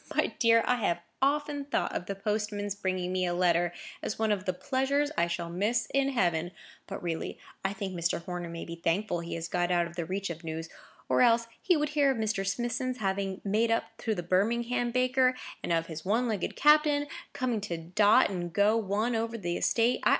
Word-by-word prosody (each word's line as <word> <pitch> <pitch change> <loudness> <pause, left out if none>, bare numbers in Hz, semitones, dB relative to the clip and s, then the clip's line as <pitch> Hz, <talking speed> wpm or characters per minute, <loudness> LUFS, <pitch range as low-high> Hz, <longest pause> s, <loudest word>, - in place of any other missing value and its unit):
My - - +1
dear, 230 -1 +5
I 250 - +2
have 175 -7 0 0.2
often 285 +1 +1
thought 285 - -1
of 180 - -3
the 200 - -3
postman's 210 0 -2
bringing 185 -2 -2
me 185 -1 +1
a 175 - -1
letter 175 -1 +2 0.3
as - - -3
one 220 -1 +1
of 200 -2 -1
the 185 - +1
pleasures 275 +8 0
I 170 - +2
shall 170 0 -3
miss 215 +7 +1
in 275 0 +3
heaven. 175 -8 0 0.3
But, - - -6
really, 165 -2 -3 0.3
I 195 +1 0
think 195 -1 -4
Mr. 170 -1 0
Horner 175 -1 -4
may 165 0 -6
be 170 - -7
thankful 170 +3 0
he 170 0 -5
has 165 0 -4
got 175 +1 0
out 175 -1 +2
of 170 0 -9
the 170 -2 -2
reach 190 +1 -3
of 165 +1 -8
news; 160 0 -5 0.4
or - - +3
else 230 -1 +5 0.2
he 360 -3 +3
would 300 0 0
hear 295 -2 +3
of 265 - +1
Mr. 215 -3 0
Smithson's 240 +4 -1
having 195 -2 -2
made 215 +3 +2
up 230 - -1
to 220 -2 -1
the 175 - -4
Birmingham 235 +7 +1
baker, 255 +1 +3 0.3
and - - -3
of 165 -1 +2
his 160 -1 -7
one 225 +6 +1
legged 210 -5 -2
captain, 300 -1 +5 0.3
coming 245 -4 -1
to 175 -4 -3
dot 185 +6 +4
and 175 -2 -3
go 205 +4 +3
one 220 +2 0
over 230 +1 -1
the 175 -5 -2
estate. 235 +2 +2
205 Hz, 210 wpm, -29 LUFS, 175-240 Hz, 0.4 s, dear